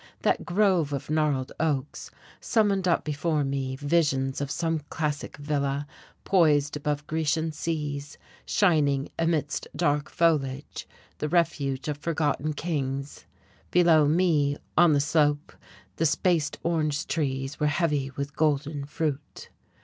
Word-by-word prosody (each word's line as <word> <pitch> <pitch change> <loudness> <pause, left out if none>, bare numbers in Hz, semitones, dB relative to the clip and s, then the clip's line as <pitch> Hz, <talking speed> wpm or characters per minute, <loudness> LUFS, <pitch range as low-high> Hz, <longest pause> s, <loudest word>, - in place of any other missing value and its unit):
That - - +2
grove 180 -6 +2
of 140 +1 -4
gnarled 150 -4 +1
oaks 145 -3 -2 0.3
summoned 200 -5 +1
up 170 - +2
before 150 0 0
me 135 -1 -2
visions 140 -2 0
of 140 - -2
some 165 +1 -1
classic 150 -3 -3
villa 145 -1 -1 0.4
poised 150 -6 +3
above 150 0 -2
Grecian 160 +1 0
seas, 150 -2 -4 0.3
shining 145 -7 +2
amidst 160 -4 0
dark 145 -3 0
foliage, 145 -5 0 0.3
the 150 - -2
refuge 145 -6 0
of 150 -1 -2
forgotten 155 -2 -1
kings. 140 -4 -3 0.4
Below 165 -4 +5
me, 150 -3 +2 0.2
on 170 -1 +6
the 145 - +3
slope, 145 0 +1 0.4
the 165 - +3
spaced 155 -1 +1
orange 155 -2 0
trees 135 -3 -2
were 150 - +2
heavy 150 -3 0
with 140 +1 -6
golden 150 -1 0
fruit. 150 -1 -4
150 Hz, 125 wpm, -26 LUFS, 140-165 Hz, 0.4 s, on